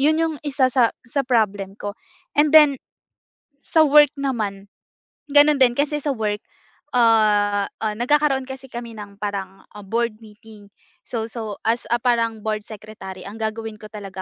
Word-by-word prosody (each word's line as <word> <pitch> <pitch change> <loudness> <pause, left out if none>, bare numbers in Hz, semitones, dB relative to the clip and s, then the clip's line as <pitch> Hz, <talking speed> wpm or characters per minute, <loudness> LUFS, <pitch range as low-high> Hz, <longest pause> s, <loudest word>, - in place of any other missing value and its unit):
Yun 310 +3 +3
yung 325 -1 0
isa 275 -2 +2
sa 240 -3 +4 0.2
sa 275 +3 -1
problem 205 -4 0
ko. 205 0 -5 0.4
And 295 0 +5
then 295 -4 +7 0.8
sa 320 - +3
work 295 0 +6
naman, 210 -8 -3 0.6
ganun 295 0 +6
din, 245 -2 +6
kasi 295 +1 +1
sa 290 - 0
work, 210 -2 -2 0.5
ah, 210 -3 +3 0.2
ah, 215 -1 -1
nagkakaroon 270 +1 +2
kasi 265 0 -9
kami 235 -1 -7
ng 205 -1 -10
parang, 195 -2 -5
ah, 210 - -9
board 230 +1 -1
meeting. 210 -1 -15 0.4
So 225 -2 -3
so 220 -3 -6
as 230 +2 0
a 240 - +4
parang 230 -3 +1
board 215 -1 -1
secretary, 205 -3 -10
ang 210 +3 -9
gagawin 220 0 -4
ko 215 - -9
talaga, 195 -3 -8
225 Hz, 160 wpm, -22 LUFS, 210-265 Hz, 0.8 s, then